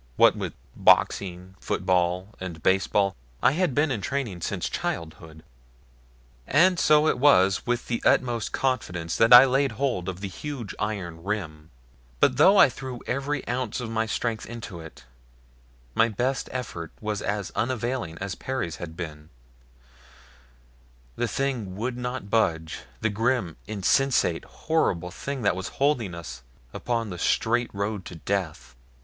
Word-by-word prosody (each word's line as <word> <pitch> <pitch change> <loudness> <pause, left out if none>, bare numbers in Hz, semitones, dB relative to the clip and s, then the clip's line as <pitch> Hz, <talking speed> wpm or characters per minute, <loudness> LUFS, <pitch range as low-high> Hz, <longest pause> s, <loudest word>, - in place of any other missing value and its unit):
What - - +6
with - - -4 0.2
boxing, 90 -1 +2
football, 90 +1 0
and 85 -4 -7
baseball, 95 0 +2 0.3
I - - +6
had 165 -3 0
been 145 0 +2
in 110 -6 -2
training 115 -7 -3
since - - -2
childhood. 80 -1 -5 1.0
And 175 +5 +4
so 150 0 +5
it - - +1
was 100 -10 +4
with 120 0 0
the 115 - -2
utmost 120 -3 +2
confidence 90 -11 -1
that 115 - +4
I 125 +2 +11
laid 135 -1 +1
hold 115 -7 -1
of 95 0 -6
the 100 - -3
huge 120 +1 -6
iron 90 -6 -4
rim; 80 -7 -4 0.5
but 130 -2 +3
though 190 +8 +6
I 190 - +9
threw 130 -2 -7
every 140 +3 -2
ounce 125 -2 -2
of 120 -2 -5
my 110 0 0
strength 115 0 -2
into 115 -6 -7
it, 80 -1 -12 0.9
my 115 - +3
best 125 +5 -1
effort 95 -10 -5
was 105 -1 -3
as 105 -2 -2
unavailing 120 -7 -2
as 100 0 -4
Perry's 130 -11 -4
had 80 -2 -8
been 75 -3 -7 1.9
the 120 - -1
thing 120 -6 -2
would 120 +5 -3
not 125 -3 -4
budge 80 -8 +1 0.2
the 110 - +1
grim, 115 -5 0
insensate, 110 -2 +1
horrible 90 - -1
thing 135 +5 -5
that 100 -3 +2
was 95 0 -4
holding 125 - +1
us 70 -9 -8 0.3
upon 115 -3 -2
the 90 - -6
straight 120 +6 +1
road 100 0 -3
to 90 - -8
death! 90 -4 -3
110 Hz, 145 wpm, -26 LUFS, 90-130 Hz, 1.9 s, I